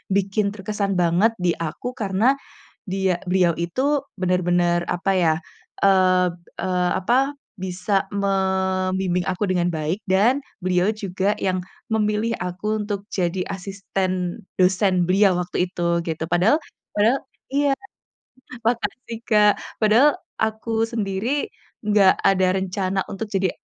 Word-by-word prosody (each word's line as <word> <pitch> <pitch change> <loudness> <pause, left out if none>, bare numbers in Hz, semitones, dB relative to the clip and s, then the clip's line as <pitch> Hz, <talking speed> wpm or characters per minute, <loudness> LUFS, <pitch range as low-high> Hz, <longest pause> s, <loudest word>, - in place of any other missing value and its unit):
bikin 200 +1 +1
terkesan 200 -1 -2
banget 175 +7 +3
di 180 - +2
aku 245 +10 -5
karena 220 +5 +2 0.5
dia 190 -2 0
beliau 180 -2 +3
itu 170 +10 -3 0.4
benar-benar 175 -1 +2
apa 185 +2 0
ya, 175 -4 +3 0.5
eee 185 -1 +4 0.3
eee, 180 -1 0
apa, 235 +7 +1 0.5
bisa 185 +2 -3 0.2
membimbing 190 -2 0
aku 185 +2 -2
dengan 175 -1 +1
baik 160 +7 -2
dan 225 +9 +3 0.2
beliau 180 +1 +2
juga 200 -1 -1
yang 185 -1 -1 0.3
memilih 215 +1 +1
aku 180 +3 -5 0.2
untuk 205 -1 -4
jadi 180 0 -1
asisten 190 0 -3 0.2
dosen 185 -1 +3
beliau 190 -1 +4
waktu 180 - -5
itu 180 - -7 0.3
gitu, 160 0 -2
padahal 195 - +4 0.4
padahal 225 +6 +4 0.3
iya. 285 0 +3 1.0
Makasih, 230 0 -2
Kak. 210 -1 +6 0.3
Padahal 225 +7 +6 0.3
aku 220 +1 -2 0.2
sendiri 225 +5 -1 0.4
enggak 205 -3 +5
ada 190 -1 +4
rencana 190 0 -1
untuk 205 +2 -4
jadi 190 -1 +2
190 Hz, 120 wpm, -22 LUFS, 180-210 Hz, 1.0 s, Kak